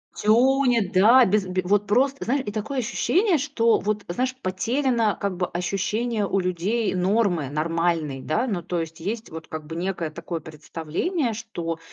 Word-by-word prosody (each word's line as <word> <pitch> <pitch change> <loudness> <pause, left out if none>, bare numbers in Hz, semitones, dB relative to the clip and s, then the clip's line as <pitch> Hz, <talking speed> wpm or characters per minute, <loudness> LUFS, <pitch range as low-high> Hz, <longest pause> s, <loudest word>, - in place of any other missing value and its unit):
Тюнит, 240 -1 +3
да. 230 +7 +6
Без 200 0 +1
бе 185 0 -1
вот 205 +2 +2
просто, 270 +6 +2
знае 265 +2 0
и 205 - -4
такое 225 +6 -3
ощущение, 350 - +2
что, 250 -5 +2
вот, 210 0 -2
знаешь, 255 +9 -1
потеряно, 230 +3 0
как 195 -3 -2
бы, 180 - 0
ощущение 205 +5 -1
у 195 - +1
людей 185 +6 0
нормы, 180 - +1
нормальной, 160 -2 -1
да. 230 - 0
Ну, 195 -8 -2
то 175 0 -3
есть, 165 0 -6
есть 215 +6 -4
вот 160 0 -8
как 155 -1 -6
бы 160 +1 -7
некое 175 -3 -2
такое 165 +1 -5
представление, 165 - -3
что, 170 -7 -5
200 Hz, 165 wpm, -24 LUFS, 170-235 Hz, -, да